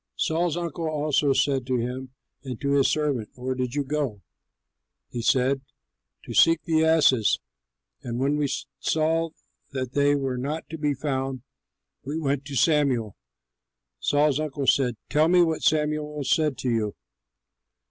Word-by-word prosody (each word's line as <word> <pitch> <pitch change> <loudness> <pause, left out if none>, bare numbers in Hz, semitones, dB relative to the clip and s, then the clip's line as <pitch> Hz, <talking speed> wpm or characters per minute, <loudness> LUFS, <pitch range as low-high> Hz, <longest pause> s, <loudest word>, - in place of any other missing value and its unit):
Saul's 165 0 0
uncle 170 -1 -3
also 150 -2 +1
said 135 -1 +2
to 130 -1 +1
him 125 +2 -4 0.3
and 130 -4 -6
to 140 -1 -1
his 140 -1 +4
servant, 145 -8 -1
"Where 130 +1 -3
did 130 0 -3
you 145 - +1
go?" 135 -8 -3 0.9
He 120 - -3
said, 130 +3 +2 0.6
"To - - -7
seek 165 -1 +5
the 160 -1 +2
asses; 155 -8 +4 0.6
and 120 -1 -4
when 140 +3 +1
we 145 -2 0 0.3
saw 160 +2 +1 0.4
that 130 -2 -3
they 145 +1 +3
were 135 -3 -2
not 150 +5 -4
to 160 - -6
be 145 -1 0
found, 135 -2 -3 0.6
we 145 +4 -4
went 140 -3 -1
to 140 0 -6
Samuel." 135 - +2 0.8
Saul's 145 0 +2
uncle 145 -2 -3
said, 125 -3 +3
"Tell 155 +2 +3
me 175 +1 +5
what 160 -2 0
Samuel 150 -1 0
said 150 0 +1
to 130 - -2
you." 110 -3 -1
140 Hz, 150 wpm, -25 LUFS, 130-155 Hz, 0.9 s, seek